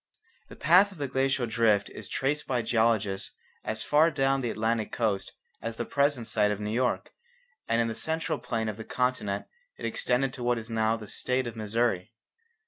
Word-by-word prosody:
The - - -10
path 190 +4 +5
of 190 - -13
the 145 -2 -2
glacial 135 -1 +1
drift 110 -3 +2
is - - -8
traced 145 +2 -1
by 125 -3 0
geologists 110 -4 +1 0.3
as 110 0 -3
far 155 +3 +5
down 135 -2 +1
the 120 - -1
Atlantic 110 0 -1
coast 110 -4 -1 0.3
as 115 0 -4
the 120 - -3
present 140 -3 +1
site 105 -2 +2
of 105 -1 -1
New 105 0 -3
York, 125 +1 0 0.6
and 115 - +2
in 115 - +2
the 115 - -2
central 160 +6 -2
plain 115 -2 -2
of 105 -1 -3
the 110 - -6
continent 125 -6 -1 0.3
it - - -6
extended 125 +1 0
to 125 - -6
what 120 0 +2
is 115 0 -6
now 110 0 +2
the 110 -2 -9
state 125 +5 -1
of 120 -1 -5
Missouri. 110 -2 0
115 Hz, 195 wpm, -28 LUFS, 110-135 Hz, 0.6 s, path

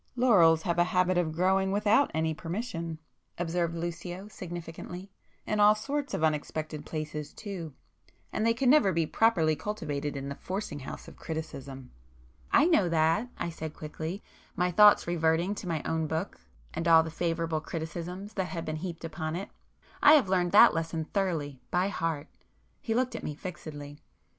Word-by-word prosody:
"Laurels 175 -11 +5
have 170 -1 0
a - - +7
habit 180 0 +2
of 175 -3 +1
growing 190 +3 +2
without 210 +7 +3
any 160 0 0
permission,"—observed 170 -2 -4
Lucio 175 +3 -5
significantly—"In 180 +3 -7
all 210 +1 +7
sorts 280 +6 -3
of - - -2
unexpected 155 0 -2
places 150 -1 -5
too. 180 -9 -7 0.6
And 215 - 0
they 230 0 +3
can 260 +2 0
never 255 -7 +6
be 165 -1 +1
properly 165 -5 +3
cultivated 150 -8 -4
in 135 0 -5
the 140 - -3
forcing 185 -1 -5
house 135 - -8
of - - -12
criticism." 140 -5 -6 0.6
"I 290 - +6
know 315 - +3
that!" 165 +8 +2
I 170 - -3
said 160 -1 -7
quickly, 160 +5 -6 0.3
my 180 0 +1
thoughts 210 +3 +7
reverting 170 +2 +1
to 200 - -7
my 160 -3 -2
own 160 -1 -1
book, 160 +5 -3 0.3
and 165 +1 -2
all 165 -1 +7
the 160 - -6
favourable 165 -1 -1
criticisms 175 +6 -6
that 190 -3 -1
had 165 -1 -5
been 155 0 -3
heaped 170 0 -6
upon 155 0 -4
it—"I 200 - 0
have 280 -9 +5
learned 180 -2 +2
that 235 +3 +8
lesson 165 -1 -2
thoroughly, 160 -9 -2
by 180 +2 +1
heart!" 165 -6 -2 0.6
He 225 - -1
looked 255 +1 0
at - - -4
me 150 - -4
fixedly. 145 -4 -8
170 Hz, 160 wpm, -29 LUFS, 160-195 Hz, 0.6 s, that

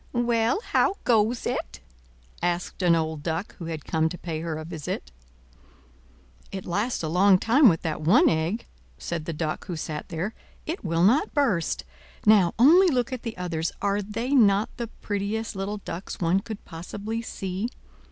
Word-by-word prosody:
"Well, 240 - +1
how 400 - +3
goes 230 +1 +2
it?" - - -3 0.6
asked 175 +2 -2
an 175 -2 +5
old 160 -2 -1
Duck 165 +5 -3
who 170 - -7
had 160 -3 -5
come 160 0 +1
to 175 - -7
pay 165 -3 -4
her 165 -2 -3
a 155 - -6
visit. 150 - -5 1.4
"It 190 -1 -6
lasts 205 +4 -1
a - - -1
long 185 +4 +5
time 245 +6 +5
with 165 - 0
that 160 -2 -2
one 165 +6 +5
egg," 165 +8 0 0.3
said 160 - -4
the - - -3
Duck 155 +2 -3
who 180 - -3
sat 155 -1 -5
there. 180 +6 -3 0.3
"It 325 +4 -4
will 165 -2 +1
not 245 +12 +3
burst. 230 - +1 0.4
Now, 205 -5 +5
only 335 +10 +7
look 255 -5 +1
at 255 - -4
the 230 -5 -6
others; 170 -2 -2
are 200 0 0
they 225 +6 -4
not 210 -5 +4
the 235 - -3
prettiest 210 +1 -3
little 195 +2 -3
ducks 190 -2 -7
one 175 +2 +2
could 215 0 -8
possibly 205 +7 -5
see? 195 0 -4
195 Hz, 170 wpm, -26 LUFS, 165-225 Hz, 1.4 s, only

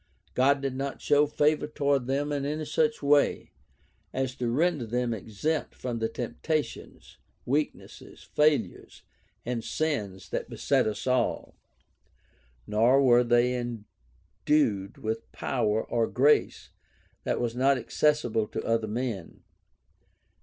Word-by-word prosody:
God 135 +2 +3
did 135 -2 -1
not 135 +1 -4
show 145 0 +3
favor 150 +1 +1
toward 140 -4 0
them 140 +2 -1
in 145 -1 -1
any 155 +2 -2
such 230 +1 0
way 145 0 +2 0.6
as 130 -1 -2
to 120 -1 -1
render 150 -1 +1
them 120 +1 -1
exempt 115 +9 -3
from 120 -2 -4
the 110 0 -1
temptations, 140 +7 -4 0.3
weaknesses, 145 +4 -3
fail 150 -3 +3
ures, 95 - -14 0.4
and 120 -2 -2
sins 100 - -3
that - - -3
beset - - +1
us 105 -1 -4
all. 130 -1 0 1.1
Nor 115 +6 +4
were 120 -2 +5
they 120 +1 +3
endued 105 - -2
with 110 +1 -4
power 105 +1 0
or 115 -1 +1
grace 145 +4 +2 0.5
that - - -1
was 120 -1 -2
not 135 +2 +3
accessible 120 -3 +1
to - - -5
other 115 -1 +1
men. 110 -5 -4
125 Hz, 125 wpm, -28 LUFS, 115-145 Hz, 1.1 s, were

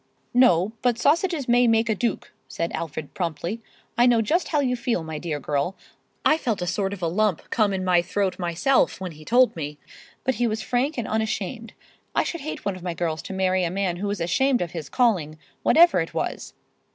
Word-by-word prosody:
"No, 215 -6 +4
but 245 -2 +2
sausages 310 +2 +1
may 245 0 +4
make 225 0 +3
a 220 - +2
duke," 225 0 -2 0.2
said 170 0 -3
Alfred, 160 -2 -5
promptly. 175 +5 -3 0.4
"I 240 - +6
know 240 -2 +4
just 315 - +1
how 300 - +1
you 255 -3 +1
feel, 240 -8 -1
my 160 -1 -5
dear 155 -3 -3
girl—I 150 - -2
felt 225 -8 -1
a 180 - -2
sort 195 +2 -1
of 200 -3 -6
a - - +2
lump 195 +1 0
come 215 -3 +2
in 190 -1 -2
my 180 -1 +4
throat 190 +2 -1
myself 180 +11 +1
when 185 -2 -5
he 155 -1 -13
told 245 +7 +4
me—but 150 - -6
he 240 - +3
was 220 -1 -2
frank 265 +5 0
and 235 - -2
unashamed. 220 +1 -3 0.4
I - - +3
should 335 - -4
hate 300 -6 -6
one 200 -2 -1
of 185 - -10
my 175 -1 -4
girls 165 -2 -2
to - - -7
marry 185 -1 +1
a 170 - 0
man 185 -1 -1
who 205 +3 -3
was 200 -1 -2
ashamed 245 +8 +2
of 170 - -6
his 165 -5 -6
calling, 180 -11 +1 0.2
whatever 340 - +5
it 165 - -4
was." - - -3
200 Hz, 210 wpm, -24 LUFS, 170-245 Hz, 0.4 s, I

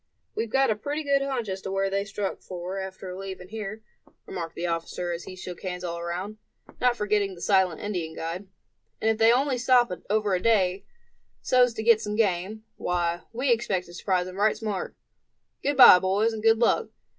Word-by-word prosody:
"We've 225 0 -2
got 270 +1 +3
a - - +1
pretty 290 +8 -4
good 280 -1 +2
hunch 265 -5 -2
as 190 0 -4
to 190 - -5
where 195 0 +1
they 200 +1 -1
struck 200 -1 -4
for 185 +1 -6
after 190 -1 -7
leaving 190 -1 -7
here," 215 0 -6 0.4
remarked 165 -2 -6
the 175 - -3
officer, 170 +1 -3
as 170 0 -5
he 185 - -8
shook 180 -1 -8
hands 180 -2 -5
all 170 -1 -4
around, 180 +5 -5 0.4
not 250 -1 +3
forgetting 205 -2 0
the - - -13
silent 190 -5 +2
Indian 175 -6 -4
guide; 170 +4 -5 0.5
"and 220 - +2
if 220 - -3
they 225 +1 +6
only 260 +1 +1
stop 245 -2 +4 0.2
over 210 -1 +1
a 180 - +1
day, 195 -4 +2 0.6
so's 250 -2 +3
to 220 - -3
get 225 -1 +5
some 210 -1 -3
game, 210 0 0
why, 175 -1 -1
we 250 +3 0
expect 205 -6 0
to 175 - -14
surprise 180 0 0
them 185 +1 -8
right 210 +2 +2
smart. 210 -4 -4 0.7
Good 285 -1 -1
bye, 240 -8 +10
boys 200 +5 +1
and 220 - -5
good 225 +1 +5
luck. 235 - +2
200 Hz, 200 wpm, -26 LUFS, 180-225 Hz, 0.7 s, bye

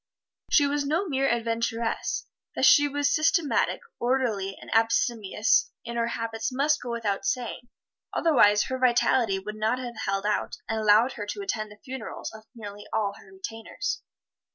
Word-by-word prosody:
She 290 - +5
was 285 +1 0
no 320 +8 0
mere 275 -3 +1
adventuress. 230 0 -1 0.3
That - - +3
she 290 -1 +7
was 285 0 +1
systematic, 325 -1 +2 0.2
orderly 235 -6 0
and - - -7
abstemious 225 - +2 0.2
in 235 0 -5
her 235 0 +1
habits 230 +1 -3
must 290 +4 +1
go 245 - -6
without 225 -4 -2
saying, 245 -1 -3 0.4
otherwise 210 -11 +4
her 260 0 -4
vitality 240 -4 +3
would 210 +3 -6
not 220 +3 +1
have 245 -3 -6
held 195 +1 -1
out 210 0 0
and 225 0 -1
allowed 215 +4 +5
her 205 -2 -6
to 405 - -4
attend 215 - -3
the 210 - -13
funerals 260 -4 -6
of 220 0 -12
nearly 205 -2 -9
all 205 -2 0
her 190 - -17
retainers. 225 - -5
235 Hz, 160 wpm, -27 LUFS, 215-265 Hz, 0.4 s, she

